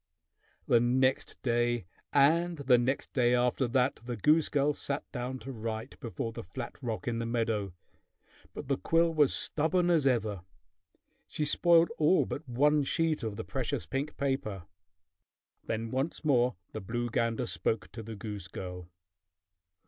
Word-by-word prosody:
The 120 - +5
next 130 +2 +1
day 120 -3 +1 0.3
and 165 +5 +3
the 130 -4 +4
next 130 +3 -1
day 125 -2 +3
after 125 +1 +1
that 130 +2 +1
the 120 -1 -4
goose 155 - +3
girl 145 +1 +2
sat 140 0 -3
down 125 0 -4
to 135 - -6
write 115 0 -5
before 115 -3 -4
the - - -6
flat 120 +10 -8
rock 120 +2 -4
in 115 -1 -1
the 115 - -2
meadow; 110 -5 -1 0.8
but 145 - -8
the 135 -1 +1
quill 165 0 +2
was 150 -4 +4
stubborn 175 +3 +1
as 155 -5 +3
ever. 110 -7 0 0.9
She 150 - -2
spoiled 170 +3 +4
all 155 +5 +4
but 140 -2 -6
one 145 +5 +3
sheet 160 +1 0
of 110 -3 -3
the - - -5
precious - - -2
pink 140 +3 -3
paper. 135 -9 -2 1.0
Then 115 0 -2
once 135 +5 -2
more 125 -4 +3 0.2
the - - -5
blue 120 +4 -3
gander 115 +1 0
spoke 115 -2 -2
to 115 - -7
the 110 0 -7
goose 100 -3 -6
girl. 90 -2 -7
125 Hz, 155 wpm, -30 LUFS, 115-145 Hz, 1.0 s, The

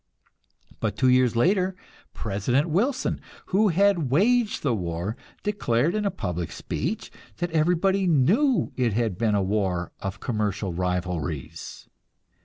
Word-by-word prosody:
But - - -2
two 130 - +3
years 125 -2 +4
later 185 - +2 0.4
President 115 - 0
Wilson, 245 - 0 0.3
who 210 +3 +5
had 185 -5 +3
waged 220 - +2
the 140 -5 +2
war, 90 +1 -3 0.3
declared 170 - +1
in 215 -1 -1
a - - +3
public 90 - -4
speech - - -4 0.3
that 175 -1 -2
everybody 180 +4 +2
knew 205 - +3
it 120 -4 +1
had 115 -3 0
been 110 +2 +1
a 100 - +2
war 95 -3 -1
of 95 -1 -5
commercial 105 -5 -2
rivalries. 90 -4 -3
125 Hz, 130 wpm, -25 LUFS, -, 0.4 s, who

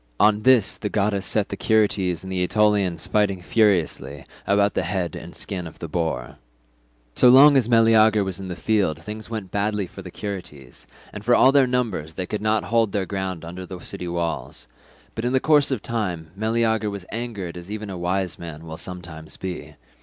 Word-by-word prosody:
On 105 0 +4
this 125 -4 +4
the 105 - -3
goddess 100 -2 0
set 105 -2 0
the - - -4
Curetes 100 -5 +1
and 95 - -7
the 90 -1 -1
Aetolians 95 -3 +2
fighting 100 -3 +1
furiously 90 - +1 0.2
about 100 0 +3
the - - 0
head 90 -4 -2
and - - -8
skin 90 -3 -4
of 80 - -12
the 85 - -6
boar. 80 -7 -3 0.8
"So 125 - +6
long 140 +3 +8
as 125 -4 +3
Meleager 110 -2 +5
was 95 -2 -3
in 95 - -6
the 90 - -5
field 100 -8 0
things 105 +7 -8
went 110 -5 -5
badly 105 -1 -1
with 95 - -8
the 90 - -8
Curetes, 90 -10 -8 0.3
and 105 - -8
for 120 +2 +4
all 130 - +6
their 135 -2 +4
numbers 110 -11 -2
they 95 - -3
could 105 +3 -4
not 110 0 +1
hold 115 -3 +1
their 100 -2 0
ground 95 -4 -4
under 90 +2 -7
the 90 0 -8
city 90 0 -6
walls; 85 -7 -3 0.5
but 115 - -5
in 125 +1 0
the 130 - +4
course 150 0 +4
of 130 -7 -2
time 90 -9 -3
Meleager 110 0 0
was 100 -3 -7
angered 105 -7 -5
as 90 +1 -9
even 105 -1 -5
a - - -5
wise 90 +1 -2
man 80 -1 -8
will 80 0 -7
sometimes 90 -4 -7
be. 85 -5 -6
100 Hz, 200 wpm, -23 LUFS, 90-110 Hz, 0.8 s, long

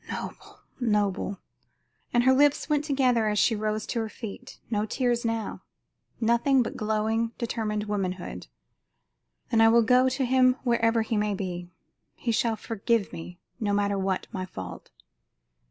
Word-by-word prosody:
Noble, - - -7 0.2
noble!" 205 -4 0 0.7
And 240 0 +3
her 260 +1 +5
lips 285 +2 +3
went 300 -2 +1
together 255 -6 +2
as 210 0 0
she 225 +3 +3
rose 215 0 -2
to 235 - -2
her 220 -1 -2
feet. 215 -1 -9
No 210 -1 +1
tears 240 +1 0
now; 225 -1 -2 0.6
nothing 235 +3 +3
but - - -5
glowing, 220 +2 0
determined 220 -3 -2
womanhood. 195 -3 -4 1.0
"Then 225 -2 +4
I 225 - +7
will 230 +1 +5
go 250 +3 +4
to 265 +1 -1
him 255 0 +4
wherever 230 -2 +2
he 220 0 -1
may 210 -1 0
be. 180 -2 -5 0.5
He 235 - -2
shall 225 0 +1
forgive 225 -1 -1
me, 175 +2 -8 0.2
no 205 -3 0
matter 200 0 +1
what 190 -1 -1
my 185 - -3
fault." 95 - -8
225 Hz, 155 wpm, -27 LUFS, 205-240 Hz, 1.0 s, I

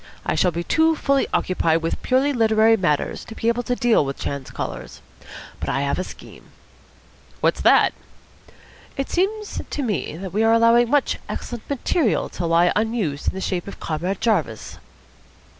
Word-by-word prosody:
I - - 0
shall 185 - +2
be 170 0 -3
too 320 - +3
fully 275 -2 +1
occupied 165 -3 +1
with 165 - -2
purely 265 +3 +2
literary 225 -1 +4
matters 150 -8 -1
to 225 - -10
be 225 - 0
able 235 +1 0
to 245 +1 -2
deal 240 -8 +3
with 135 0 -4
chance 140 -2 -5
callers. - - -6 0.6
But - - -4
I 135 - 0
have 140 +3 -1
a - - -1
scheme." - - -12 0.9
"What's - - +1
that?" - - +5 1.0
"It 275 - -3
seems 415 +4 -1
to 290 - -3
me 205 -8 -2
that 190 0 -7
we 210 - +1
are 225 0 +4
allowing 230 +1 +4
much 290 +1 +1
excellent 240 -2 -6
material 280 - 0
to 175 - -4
lie 170 +1 +4
unused 210 -10 -1
in - - 0
the 190 - -4
shape 180 -2 -2
of 200 - -9
Comrade 175 +5 -3
Jarvis." 170 - -1
220 Hz, 175 wpm, -22 LUFS, 170-245 Hz, 1.0 s, that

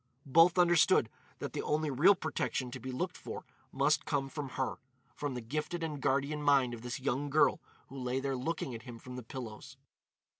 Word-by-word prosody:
Both 165 +6 +5
understood 175 -7 +5 0.3
that - - -5
the - - -2
only 150 0 0
real 170 +10 +6
protection 135 -6 -2
to - - -6
be 130 - -5
looked 125 - -2
for - - -7 0.3
must 140 +3 +2
come 135 -2 -1
from 145 0 -5
her—from 130 +1 -5
the 125 - -4
gifted 155 +8 -3
and 150 -3 -3
guardian 140 +3 +1
mind 140 -4 +4
of 115 - -7
this 125 +1 -4
young 140 +2 -1
girl 150 +2 +4 0.3
who 135 - -9
lay 125 +1 -1
there 135 0 -1
looking 135 0 -3
at 115 - -6
him 120 0 -9
from 125 +2 -9
the 125 - -5
pillows. 115 -2 -8
135 Hz, 190 wpm, -32 LUFS, 125-150 Hz, 0.3 s, real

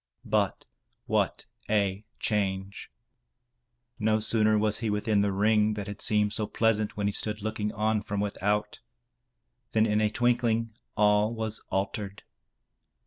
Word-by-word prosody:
But - - 0 0.4
what - - 0 0.2
a 100 -1 +1
change! 95 -2 -2 1.1
No 110 0 +2
sooner 110 0 +3
was 105 0 +1
he 115 - -1
within 105 0 +1
the 100 0 +1
ring 105 +2 +2
that 105 -1 -4
had 105 0 -7
seemed 105 -1 +3
so 110 -1 -1
pleasant 110 -2 +1
when 100 - -1
he 100 - 0
stood 105 0 -2
looking 105 -1 -2
on 110 0 +1
from 100 -1 -3
without, 105 +1 -1 0.9
than 110 0 +4
in 105 -1 +2
a 105 - +3
twinkling 115 -1 +1 0.2
all 105 +1 +4
was 110 -1 -3
altered. 100 +1 -3
105 Hz, 140 wpm, -28 LUFS, 105-110 Hz, 1.1 s, than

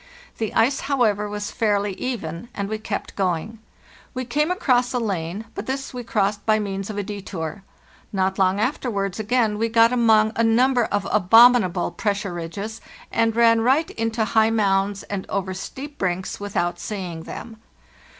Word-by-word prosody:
The 220 -2 -1
ice, 255 +5 +3
however, 210 -7 +1
was 205 0 -4
fairly 205 -2 0
even, 210 -3 -5
and 200 -1 -2
we 215 +1 -3
kept 215 -1 -5
going. 190 +3 -2 0.6
We 255 0 -3
came 300 +6 0
across 250 -9 +1
a 250 - +1
lane, 195 -2 -3
but - - -6
this 270 0 -3
we 250 -1 -5
crossed 205 -2 0
by 215 0 +3
means 195 -1 -3
of 210 - -5
a 205 - -1
detour. 195 -3 -6 0.5
Not 190 -1 0
long 190 +1 +3
afterwards 210 -6 -1
again 220 -1 +1
we 230 +1 +1
got 230 +1 +5
among 220 -3 +4
a 230 - +2
number 245 +2 +3
of 205 -2 -2
abominable 210 -2 +5
pressure 200 -3 -2
ridges, 200 +6 -6 0.3
and 225 -1 +1
ran 230 -1 +5
right 270 +7 +2
into 225 0 -1
high 220 0 +3
mounds 200 -2 +1
and 195 -2 -5
over 190 -1 -2
steep 280 +9 -8
brinks 185 0 -2
without 175 -4 -2
seeing 180 -6 -5
them. 225 +6 -8
215 Hz, 165 wpm, -23 LUFS, 195-230 Hz, 0.6 s, got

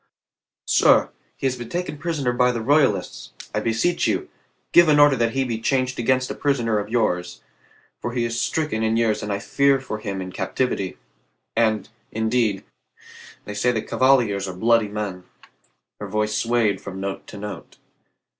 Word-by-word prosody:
"Sir, - - +4 0.3
he - - -5
has 130 -1 +1
been 120 -2 -8
taken 175 -4 -4
prisoner 150 -7 -1
by 125 0 +3
the 120 - -3
Royalists. 130 -6 +1 0.2
I - - +1
beseech 115 +10 0
you, - - -1 0.4
give 175 -2 +6
an 150 -1 +5
order 145 -1 +6
that 115 -2 0
he 135 0 +1
be 115 -3 -3
changed 130 0 0
against 130 +2 +1
a - - -2
prisoner 120 -7 0
of 105 0 -5
yours, 90 -7 -1 0.6
for 120 - -4
he 120 -1 0
is 115 0 -2
stricken 150 -4 -1
in 110 0 +1
years 115 -2 +1
and 105 - -4
I 100 - 0
fear 140 +6 +2
for 110 -5 -6
him 100 -3 -4
in 95 0 -5
captivity. 100 -4 -2 0.6
And, 110 -3 +1 0.2
indeed, 110 -2 0 0.8
they 105 - -6
say 110 +4 +1
the 110 -3 -2
Cavaliers 120 -7 +2
are 95 - -6
bloody 115 +2 +3
men." 100 -3 -5 0.7
Her 105 - -5
voice 105 +1 -1
swayed 115 -4 +1
from 95 -1 -7
note 100 0 -5
to 105 - -10
note. 105 0 -8
115 Hz, 175 wpm, -23 LUFS, 105-130 Hz, 0.8 s, give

